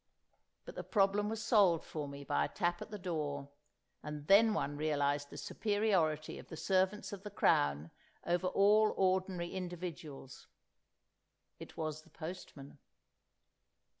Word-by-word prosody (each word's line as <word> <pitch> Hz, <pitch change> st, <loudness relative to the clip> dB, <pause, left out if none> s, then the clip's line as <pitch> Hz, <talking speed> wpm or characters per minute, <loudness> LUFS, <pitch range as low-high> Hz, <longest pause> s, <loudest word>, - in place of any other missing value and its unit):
But -, -, -8 dB
the -, -, -6 dB
problem 205 Hz, 0 st, +2 dB
was 220 Hz, -1 st, -3 dB
solved 200 Hz, -7 st, +4 dB
for 150 Hz, -2 st, -5 dB
me 140 Hz, 0 st, -8 dB
by 75 Hz, -, +1 dB
a -, -, -5 dB
tap 175 Hz, 0 st, -1 dB
at -, -, -7 dB
the 210 Hz, -, -6 dB
door, 150 Hz, -6 st, -3 dB, 0.5 s
and 150 Hz, -1 st, -6 dB
then 210 Hz, +6 st, +6 dB
one 145 Hz, -6 st, -1 dB
realised 145 Hz, -1 st, 0 dB
the -, -, -10 dB
superiority 190 Hz, -8 st, 0 dB
of -, -, -12 dB
the 160 Hz, -, -8 dB
servants 190 Hz, +3 st, +1 dB
of 195 Hz, -, -7 dB
the 210 Hz, -, -7 dB
Crown 75 Hz, -, +2 dB, 0.3 s
over 175 Hz, +2 st, +1 dB
all 210 Hz, +3 st, +4 dB
ordinary 185 Hz, -2 st, +1 dB
individuals. 170 Hz, -7 st, -7 dB, 1.1 s
It -, -, -11 dB
was 155 Hz, -1 st, -3 dB
the -, -, -22 dB
postman. 155 Hz, -4 st, -9 dB
175 Hz, 140 wpm, -34 LUFS, 145-195 Hz, 1.1 s, then